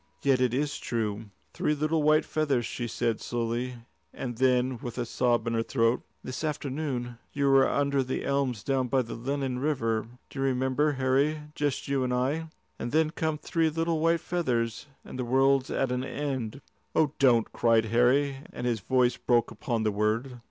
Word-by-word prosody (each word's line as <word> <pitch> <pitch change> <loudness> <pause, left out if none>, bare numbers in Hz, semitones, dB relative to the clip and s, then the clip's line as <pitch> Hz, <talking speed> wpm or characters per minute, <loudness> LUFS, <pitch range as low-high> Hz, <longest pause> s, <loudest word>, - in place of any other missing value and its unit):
"Yet 135 -2 +3
it 125 -2 +3
is 145 +4 -1
true." 110 -2 -2 0.3
"Three 150 - 0
little 155 +2 +1
white 155 +1 +4
feathers," 140 -6 0
she 120 0 -4
said 115 0 -1
slowly; 120 +1 -2 0.4
and 120 -3 -6
then, 130 -1 +2
with 120 0 -6
a 120 - -1
sob 120 -1 +1
in 115 - -1
her 115 - +1
throat, 115 0 +1 0.2
"This 130 +4 -5
afternoon 135 -5 -3 0.2
we 140 - 0
were 135 -1 +5
under 140 -1 +1
the 130 0 -3
elms 135 -6 0
down 135 -2 0
by 130 +1 +2
the 115 - -7
Lennon 135 +1 -2
River 115 -7 0 0.2
do 135 - -7
you - - +1
remember, 130 +3 +1
Harry? 135 +3 +1
just 145 -3 -2
you 140 -1 +1
and 125 -1 0
I. 145 +6 0 0.3
And 120 - -3
then 155 0 +2
come 160 -2 -1
three 160 +1 0
little 165 +1 0
white 165 +1 +2
feathers, 125 -10 -1 0.2
and 130 - -8
the - - 0
world's 135 +2 +3
at 135 -2 0
an 125 0 -1
end." 135 -3 -3 0.3
"Oh, 155 -3 +3
don't!" 120 -4 +4
cried 115 -1 +3
Harry, 125 +5 +3
and 125 - -5
his 120 -2 0
voice 125 +3 +2
broke 120 -2 +2
upon 120 -7 -2
the 110 - +2
word. 110 +5 -1
130 Hz, 185 wpm, -28 LUFS, 120-145 Hz, 0.4 s, were